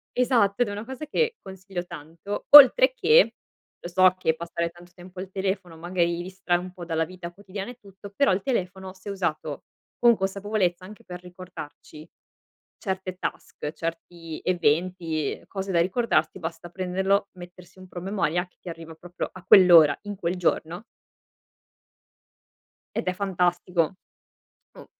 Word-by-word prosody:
Esatto, 240 -4 +2
ed 240 - +3
è - - -4
una 210 +2 -6
cosa 265 +4 -7
che, 465 +8 0
consiglio 190 -1 -7
tanto, 165 +7 -7
oltre 295 - +9
che - - +4 0.5
lo 175 - -7
so 185 +1 +4
che 160 -3 +1
passare 170 0 -3
tanto 175 +1 -17
tempo 180 0 -12
al 190 0 -7
telefono, 190 -3 -3
magari 170 0 -1
distrae 185 -1 -1
un 185 +1 -8
po' 180 -1 -9
dalla 165 -1 0
vita 175 0 -8
quotidiana 200 +3 -7
e 250 - -16
tutto. 200 0 -13
Però 280 -4 +3
il 190 +1 0
telefono 190 -6 -3
se 190 +2 -10
usato 155 -6 -3 0.3
con 240 -1 +5
consapevolezza 195 -2 -1
anche 210 +1 -13
per 180 0 -8
ricordarci 180 -4 -11 0.7
certe 190 -2 -4
task, 150 - -5
certi 165 0 -6
eventi 170 -2 0
e - - -20
cose 195 -1 -5
da 170 -2 +3
ricordarsi, 190 +2 0
basta 165 +1 -6
prenderlo, 190 +2 0
mettersi 180 +1 -13
un 185 - -12
promemoria 175 -2 -2
che - - -39
ti 180 - -10
arriva 165 -1 -9
proprio 175 +2 -6
a 185 - -13
quell'ora 175 -5 +7
in 205 -1 -6
quel 175 -1 -2
giorno 175 +3 -1 2.1
ed - - -2
è 185 - +1
fantastico. 180 -3 0 0.8
Mh. - - -11
185 Hz, 150 wpm, -25 LUFS, 175-195 Hz, 2.1 s, oltre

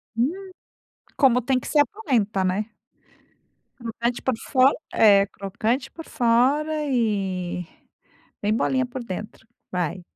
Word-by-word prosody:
Hum, 245 +7 +2 0.9
como 250 -3 +4
tem 260 0 +2
que - - -8
ser 295 - +4
a 290 - +4
polenta, 225 - -1
né. 210 +4 -1 1.1
Crocante 235 0 -3
por 260 -3 0
fo 260 0 +4 0.2
é, 200 -3 +6
crocante 225 +8 -2
por 325 - -10
fora 280 +6 +2
e 195 - -1 0.8
bem 210 +1 +1
molinha 255 +3 +1
por 250 0 -6
dentro. 210 +1 -7 0.2
Vai. 180 0 -2
235 Hz, 125 wpm, -24 LUFS, 200-260 Hz, 1.1 s, é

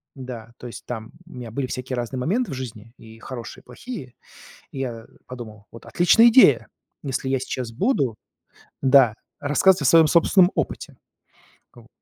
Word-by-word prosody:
да, 125 -4 -9
то 125 - -9
есть 120 - -10
там 110 -3 -7 0.2
у - - -14
меня 120 -3 -8
были 130 +3 -3
всякие 130 0 -5
разные 120 +1 -4
моменты 210 - -1
в - - -4
жизни, 115 -3 -8
и 110 0 -15
хорошие, 120 -1 -9
и - - -41
плохие. 225 - -9 0.6
И 135 - -9
я 120 -4 -5 0.2
подумал: 110 -4 -10
"Вот 115 - -13
отличная 225 +7 +5
идея, 255 +3 +5 0.3
если 135 -1 -3
я 135 0 +1
сейчас 125 -2 -5
буду 135 - 0 0.7
да, 130 -4 +5 0.3
рассказывать 150 +5 +3
о - - -2
своём 160 +3 +6
собственном 175 +3 +4
опыте". - - -4 0.8
К - - -24
вот. - - -21
130 Hz, 170 wpm, -23 LUFS, 115-155 Hz, 0.8 s, своём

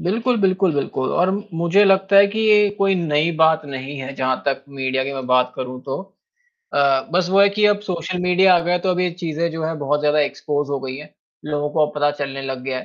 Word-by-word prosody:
बिल्कुल, 230 +7 0
बिल्कुल, 190 -2 +2
बिल्कुल, 135 -2 -2
और 180 +2 +2
म 200 +2 -3
मुझे 170 +5 +3
लगता 195 0 +3
है 200 0 +8
कि 210 +2 -5
ये 210 -1 +4
कोई 195 -1 +2
नई 160 -2 0
बात 160 -1 +3
नहीं 135 +1 -7
है, 135 +1 -6
जहाँ 130 -1 0
तक 135 -1 -1
मीडिया 130 -1 -2
की 140 - -4
मैं 135 -2 -6
बात 125 0 +2
करूँ 125 0 -6
तो। 135 - -5 0.8
अ, 140 -2 +2
बस 180 0 +1
वो 195 +1 +4
है 200 - +6
कि 210 +1 0
अब 205 0 +2
सोशल 180 -2 -4
मीडिया 180 +1 +4
आ - - +4
गया 175 +1 0
है, 180 - -1
तो 185 - 0
अब 180 0 0
ये 180 -1 0
चीज़ें 170 0 -2
जो 160 0 -4
है 160 +1 -2
बहुत 145 +1 -1
ज़्यादा 150 0 +1
एक्सपोस 145 0 -2
हो 140 - -1
गई 130 0 -6
हैं, 150 +1 -11 0.3
लोगों 150 0 -2
को 155 0 +2
अब 150 - -10
पता 145 0 +2
चलने 135 -1 -4
लग 135 -1 -5
गया 130 -1 -3
है, - - -8
160 Hz, 250 wpm, -20 LUFS, 140-185 Hz, 0.8 s, है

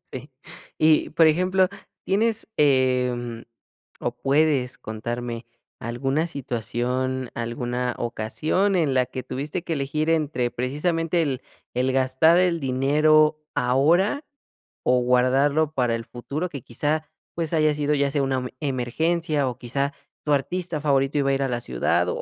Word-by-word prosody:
Sí - - -8 0.5
y 155 -1 +4
por 165 0 +5
ejemplo 185 +3 +3 0.4
tienes, 220 +3 +1
em, 125 -4 +1 0.6
o 120 - -1
puedes 140 -2 +1
contarme 115 +2 -5 0.3
alguna 135 +6 -1
situación, 130 -1 -2
alguna 120 +1 -3
ocasión 150 - 0
en 155 -7 +2
la 130 -1 +3
que 130 - -6
tuviste 150 +6 -4
que 165 - -2
elegir 150 +3 -1
entre 145 -7 0
precisamente 165 +7 0
el 135 -4 -1 0.3
el 130 +2 +1
gastar 130 +6 +4
el 175 -2 +2
dinero 150 +3 +3
ahora 165 - +2 0.6
o 125 0 +3
guardarlo 135 +5 +2
para 125 -4 +1
el 115 0 -5
futuro 145 +8 -4
que 140 -5 -7
quizá 155 +6 -2 0.3
pues 165 -1 -2
haya 155 -2 +3
sido 150 0 0
ya 140 -1 +1
sea 140 -1 +1
una 135 -1 0
em 125 0 -3
emergencia 150 +3 0
o 120 - -7
quizá 140 +3 -2 0.3
tu 150 - +2
artista 165 +2 -1
favorito 140 -1 +1
iba 140 -1 +1
a - - +2
ir 135 - 0
a - - 0
la 120 -1 -2
ciudad. 85 - 0
140 Hz, 145 wpm, -24 LUFS, 125-155 Hz, 0.6 s, por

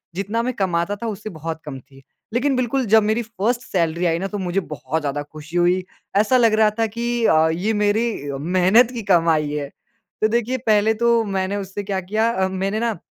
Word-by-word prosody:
जितना 200 +5 -1
मैं 255 +1 -1
कमाता 185 -2 -1
था, 230 +3 -6
उससे 215 0 -5
बहुत 160 -2 -6
कम 135 -3 -6
थी। 135 +1 -19 0.3
लेकिन 265 +3 +1
बिल्कुल 255 +1 0
जब 220 +1 +5
मेरी 220 +3 +1
फर्स्ट 230 +2 -2
सैलरी 170 -3 -1
आई 165 -1 +1
ना, 195 - -2
तो 205 +1 -5
मुझे 185 0 -1
बहुत 150 -2 -4
ज़्यादा 145 0 -2
खुशी 155 +3 -8
हुई। 175 +1 +2 0.3
ऐसा 220 +5 +4
लग 230 -3 +4
रहा 215 -1 +5
था 225 - +3
कि 235 +2 -2
अ, 160 -3 +4
ये 200 +7 -1
मेरी 210 -7 0
मेहनत 185 - +4
की 235 - -4
कमाई 165 -3 +3
है। 145 -1 -3 0.5
तो 215 - +4
देखिए, 235 +3 0
पहले 220 -3 +2
तो 235 0 +2
मैंने 195 -1 -2
उससे 200 0 -5
क्या 195 -1 -2
किया 215 +5 0
अ, 190 -5 0
मैंने 195 +3 -2
ना 230 -3 -1
200 Hz, 205 wpm, -21 LUFS, 170-225 Hz, 0.5 s, जब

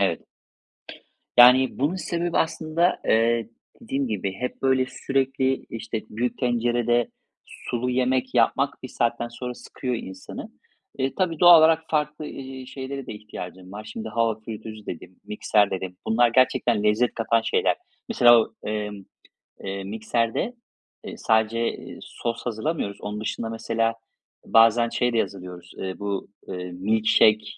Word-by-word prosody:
Evet. 95 -4 +1 1.2
Yani 125 +2 +7
bunun 145 +7 +1
sebebi 170 0 -2
aslında, 160 +2 +1
eee, 115 0 +2 0.3
dediğim 140 - -2
gibi 100 -3 -2
hep 125 +6 -5
böyle 130 -1 +3
sürekli, 135 -1 -1
işte, 115 -1 -4
büyük 120 +3 -2
tencerede 120 -1 +1 0.4
sulu 125 +1 -4
yemek 130 0 0
yapmak 135 +4 +2
bir - - -4
saatten 120 -1 -1
sonra 125 +1 -6
sıkıyor 125 +1 -5
insanı. 95 -4 -8 0.5
Eee, 135 0 -1
tabii, 170 -5 0
doğal 175 -2 +9
olarak 160 0 +4
farklı, 150 0 -1
ııı, 130 -2 -8
şeylere 135 0 -6
de - - -5
ihtiyacım 95 -3 -9
var. 105 +2 -7
Şimdi 110 0 -5
"hava 115 -1 0
fritözü" 110 -1 -8
dedim 90 +2 -8
"mikser" 105 -1 +2
dedim. 95 -1 -4
Bunlar 120 +2 +4
gerçekten 120 -4 +3
lezzet 105 +3 +2
katan 115 0 +1
şeyler. - - +1 0.3
Mesela 120 -1 +7
o - - -6
emm, 105 -2 -4 0.6
eee, 95 0 -4
mikserde, 115 - -1 0.5
eee, - - -7
sadece, 110 0 +1
eee, - - -8
sos 115 -1 -5
hazırlamıyoruz. 115 -2 -2
Onun 105 +1 -5
dışında 115 +1 -3
mesela 115 0 -1 0.5
bazen 115 +1 +5
şey 120 +1 0
de 115 - +2
hazırlıyoruz: 90 -2 -6
Eee, 95 -1 -5
bu, 100 -1 -3 0.2
eee, 90 -1 -5
milk 105 +5 -1
shake, 110 0 +5
115 Hz, 140 wpm, -24 LUFS, 105-130 Hz, 1.2 s, doğal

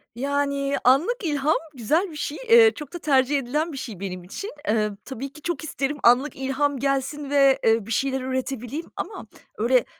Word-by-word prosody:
Yani, 280 +1 -1
anlık 285 - +4
ilham 300 -2 +1 0.2
güzel 310 - 0
bir - - -10
şey. 295 0 -4
Eee, 460 -1 +8
çok 300 +1 -9
da 350 - -5
tercih 280 -2 +2
edilen 300 +6 -2
bir 275 - -7
şey 220 -8 -7
benim 185 -2 -5
için. 300 - -7
Emm, 215 -4 +1
tabii 270 +1 -6
ki, 305 - -13
çok 335 -3 -3
isterim 290 -1 -2
anlık 250 +5 +4
ilham 270 +1 -1
gelsin 275 +1 -1
ve, 275 -1 +4
eee, 225 -2 +3
bir 225 - -8
şeyler 265 +2 0
üretebileyim 260 +3 -3
ama - - -6 0.3
öyle, 240 +2 +3
275 Hz, 180 wpm, -24 LUFS, 255-295 Hz, 0.3 s, Eee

